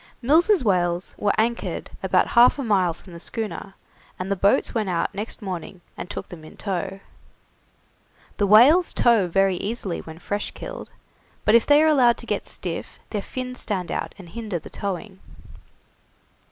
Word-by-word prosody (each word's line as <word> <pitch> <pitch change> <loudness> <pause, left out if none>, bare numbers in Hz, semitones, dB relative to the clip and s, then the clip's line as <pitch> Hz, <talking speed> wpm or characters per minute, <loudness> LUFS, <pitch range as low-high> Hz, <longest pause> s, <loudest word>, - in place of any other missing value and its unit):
Mills' 325 - +4
whales 175 -3 +1
were 205 - +2
anchored 235 +2 -1
about - - +2
half 240 +3 +6
a 280 - -3
mile 195 -6 +2
from 170 +2 -14
the 170 - -9
schooner, 205 0 -5 0.4
and 185 +2 -4
the - - +2
boats 195 +2 +2
went 215 -4 -1
out 170 -2 -1
next 210 +2 -5
morning 180 -1 -6
and - - -7
took - - -6
them 165 -3 -10
in 155 - -13
tow. 195 0 -4 1.4
The 205 - +2
whales 270 - +6
tow 230 -6 +4
very 195 +1 +2
easily 200 -4 -3
when 160 0 -11
fresh 205 +4 -3
killed, - - -8 0.6
but 210 - +4
if 235 -1 +5
they 290 +1 +6
are - - +4
allowed 255 -6 +4
to - - -10
get - - -3
stiff - - -6
their 210 - -2
fins 250 +3 -6
stand 185 -5 -3
out - - -4
and 185 -4 -12
hinder 215 -3 -4
the 160 - -11
towing. 195 0 -5
205 Hz, 170 wpm, -23 LUFS, 185-235 Hz, 1.4 s, half